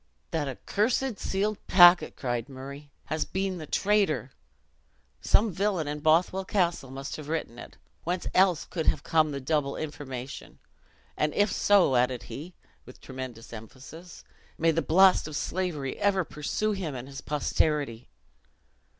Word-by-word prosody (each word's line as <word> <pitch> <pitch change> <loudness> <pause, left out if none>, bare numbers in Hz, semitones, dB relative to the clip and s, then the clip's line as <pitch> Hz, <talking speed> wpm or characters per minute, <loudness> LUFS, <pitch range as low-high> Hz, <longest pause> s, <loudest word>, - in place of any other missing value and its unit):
"That 160 -3 -1
accursed 220 - -1
sealed 205 +2 -1
packet," 175 -1 +7
cried 120 -1 -3
Murray, 140 +2 -9 0.2
"has 155 0 -1
been 190 -1 -3
the 155 - -8
traitor! 190 - +1 0.9
Some 215 0 +3
villian 185 -3 -1
in 150 0 -3
Bothwell 170 +5 +2
Castle 175 -8 0
must 135 +1 -6
have 150 -1 -9
written 155 -7 -3
it. - - -11 0.3
Whence 180 +2 -2
else 185 -4 +3
could 160 -3 -4
have 145 - +2
come 155 -1 +2
the 140 -1 -4
double 140 0 -1
information? 140 -4 -7 0.6
And 150 0 -1
if 205 +1 +3
so," 195 -10 +4
added 125 0 +1
he, 170 +6 -9 0.3
with 125 - -14
tremendous 130 -4 -8
emphasis, 135 - -11 0.3
"may 165 0 +3
the 165 +1 0
blast 185 +3 +5
of 155 - -7
slavery 155 -6 -3
ever 195 -2 +2
pursue 160 +8 -2
him 180 -8 -3
and 125 +1 -7
his 135 0 -8
posterity!" 145 -4 -1
155 Hz, 145 wpm, -27 LUFS, 135-185 Hz, 0.9 s, packet